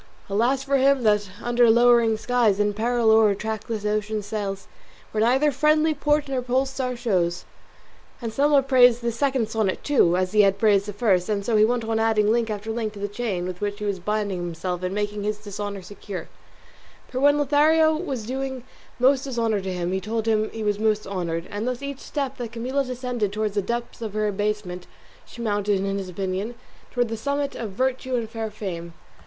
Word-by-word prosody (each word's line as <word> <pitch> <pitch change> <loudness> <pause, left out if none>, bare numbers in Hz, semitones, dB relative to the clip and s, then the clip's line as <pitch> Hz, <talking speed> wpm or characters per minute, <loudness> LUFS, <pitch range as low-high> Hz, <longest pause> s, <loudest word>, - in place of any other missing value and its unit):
Alas 245 +6 +1
for 275 0 +1
him 270 -1 +3
that 210 -2 +2
under 240 -1 +4
lowering 235 -1 +5
skies, 225 -4 +2
In 205 0 +2
peril 230 +1 +2
o'er 220 -1 +6
a 200 - +1
trackless 220 +1 -4
ocean 210 0 -1
sails, 200 -2 -4 0.4
Where 215 - -1
neither 265 +6 +3
friendly 305 +3 +3
port 295 0 +1
nor 265 -2 -1
pole 255 +2 +1
star 265 -2 -3
shows." 180 -7 0 0.7
Anselmo 275 +5 +2
praised 245 -3 +5
this 235 -1 -1
second 260 -4 0
sonnet 215 -4 -1
too, 180 -12 +3
as 185 0 0
he 210 0 +5
had 195 -1 +3
praised 200 -1 +3
the 205 - -4
first; 195 -3 +1
and 200 -2 -1
so 230 - +1
he 210 - +6
went 240 +1 +1
on 225 0 -1
adding 220 -1 +3
link 230 0 +1
after 215 +1 -4
link 220 -2 -3
to 205 - -10
the 205 - -2
chain 205 -4 -3
with 180 0 -6
which 205 0 -2
he 210 - -5
was 200 -2 -1
binding 205 0 -2
himself 175 +1 -4
and 185 +1 -3
making 205 0 -2
his 210 +1 -2
dishonour 205 -1 -6
secure; 200 0 -8 0.8
for 255 - -4
when 285 +2 +5
Lothario 310 +2 +4
was 275 -9 -4
doing 265 +1 -4 0.3
most 265 +2 +4
to - - -5
dishonour 230 -4 0
him 180 -2 -3
he 190 0 -1
told 220 +3 -2
him 215 -1 +2
he 225 - -6
was 205 -1 0
most 215 -1 +1
honoured; 170 -3 -3
and 205 +3 -3
thus 250 +1 -3
each 280 -1 -5
step 275 -2 -4
that 240 -3 -5
Camilla 255 +4 -1
descended 250 -5 -3
towards 210 0 -2
the 205 - +1
depths 235 +3 -4
of 215 -2 -5
her 215 0 +1
abasement, 205 -3 -3 0.4
she 235 - -8
mounted, 205 -2 +1
in 195 +1 -1
his 190 -1 -6
opinion, 190 +5 -3 0.3
towards 245 -2 -1
the - - -1
summit 280 +4 -2
of 225 - -5
virtue 260 +2 -1
and 225 -2 -3
fair 225 -1 -3
fame. 170 -5 -6
220 Hz, 205 wpm, -24 LUFS, 205-250 Hz, 0.8 s, o'er